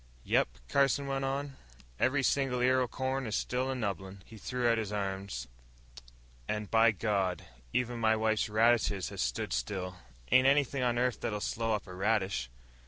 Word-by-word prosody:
"Yep," - - +3 0.2
Carson 140 - +2
went 135 0 -2
on, 135 0 -3 0.4
"every 135 +1 +2
single 135 -1 +1
ear 130 +1 +4
o' 125 - +1
corn 130 +1 -2
is 110 - -2
still 130 +1 -1
a 135 - -1
nubbin." 100 -4 -4
He 115 - -13
threw 125 +1 -1
out 115 -1 +3
his 105 -2 -3
arms. 95 -9 -3 1.0
"And, 105 -1 -3
by 115 0 +6
God, 100 -3 -1 0.3
even 120 - -1
my 110 -1 +3
wife's 110 0 +1
radishes 110 -3 +2
has - - -5
stood - - -1
still. 90 -3 -3 0.3
Ain't 130 +1 +6
anything 140 -1 +3
on 120 -1 +1
earth 125 0 0
that'll 105 -1 -2
slow 115 +2 -1
up 105 - -5
a 90 - -10
radish." 95 - 0
115 Hz, 170 wpm, -31 LUFS, 100-130 Hz, 1.0 s, by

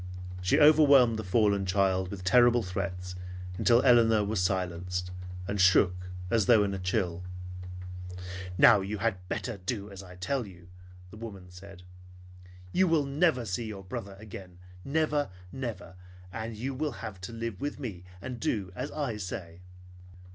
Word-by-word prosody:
She 90 - +3
overwhelmed 140 -6 +6
the - - -3
fallen 100 +1 +2
child 95 -1 +2
with 95 -2 -7
terrible 120 +3 +5
threats 90 -1 -4 0.5
until 120 +1 +5
Elinor 115 -4 +5
was 105 -2 0
silenced 90 0 -1 0.4
and 100 -1 0
shook 90 -1 +4 0.2
as 110 -4 +2
though 110 -3 +6
in 100 -1 -1
a 95 - -3
chill. 90 -1 -1 1.4
"Now 100 - +7
you 100 +3 -3
had 95 -3 -2
better 120 -4 -3
do 100 +2 -4
as 100 -1 -8
I 90 -2 -12
tell 110 +6 -2
you," 90 -2 -14 0.4
the 110 - -11
woman 100 -5 -9
said. 90 0 -12 0.9
"You 190 - +3
will 160 -4 +3
never 140 -3 +2
see 110 +3 -2
your 100 -3 -7
brother 95 +1 -6
again, 95 -4 -10 0.3
never; 150 -1 +1 0.2
never! 115 -8 -6 0.4
And 110 0 -5
you 130 +5 -3
will 145 +1 -2
have 95 -4 -7
to 95 - -6
live 115 -3 -5
with 145 +1 -3
me, 105 -10 -6 0.2
and 125 -2 -5
do 100 -3 -1
as - - -4
I 140 -8 -2
say." 90 -3 -6
100 Hz, 155 wpm, -29 LUFS, 90-120 Hz, 1.4 s, Now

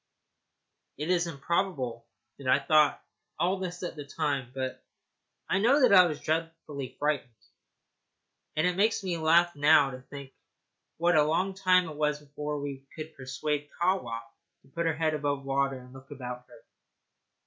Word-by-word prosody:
It 150 +5 -2
is 175 -1 +2
improbable 140 -6 -2 0.3
that 135 - -7
I 130 - +5
thought 155 -2 +4
of - - -24 0.4
all 180 +4 +1
this 180 -1 -5
at 175 - -4
the 150 - -6
time, 140 -3 -2
but 130 0 -5 0.6
I 190 - +1
know 235 +7 +5
I 200 -10 +7
was 155 -3 -4
dreadfully 155 -5 -3
frightened; 145 -3 0 1.3
and 155 +2 +2
it 180 0 +1
makes 220 +1 +2
me 175 -3 -2
laugh 170 +2 +4
now 145 -1 +5
to 130 0 -8
think 140 0 -10 0.7
what 175 +1 +3
a 155 - +6
long 180 +6 0
time 185 -2 +3
it 155 -2 -8
was 150 -1 0
before 150 0 -5
we 140 -1 -6
could 155 0 -8
persuade 145 +3 -3
Kahwa 170 -11 0 0.4
to 135 - -23
put 170 +4 -2
her 160 - +1
head 155 0 +1
above 145 -2 -2
water 135 0 0
and 125 0 -13
look 135 +1 -13
about 125 -3 -7
her. 125 - -17
150 Hz, 165 wpm, -29 LUFS, 135-175 Hz, 1.3 s, I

